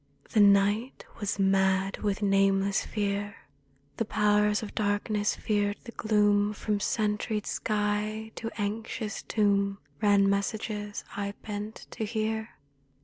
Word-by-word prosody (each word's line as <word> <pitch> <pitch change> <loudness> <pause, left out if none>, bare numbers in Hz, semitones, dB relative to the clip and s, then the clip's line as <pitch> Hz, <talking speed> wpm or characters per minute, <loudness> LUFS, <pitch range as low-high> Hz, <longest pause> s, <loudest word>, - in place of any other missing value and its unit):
The 220 - +2
night 205 +4 +4
was 205 -2 -1
mad 195 0 +2
with 205 0 -1
nameless 195 0 +3
fear. 205 -1 -2 0.6
The 230 - 0
Powers 210 0 +2
of 205 - -7
Darkness 205 0 0
feared 205 -1 0
the 235 - -9
gloom. 210 -2 +2
From 210 0 -1
sentried 210 0 -1
sky 215 +1 -1
to 225 - -5
anxious 215 +1 -3
tomb 200 -2 +1 0.2
Ran 200 -1 +5
messages 205 +1 -2
I 200 0 -3
bent 210 0 -6
to - - -4
hear. 220 0 -2
205 Hz, 120 wpm, -28 LUFS, 200-215 Hz, 0.6 s, Ran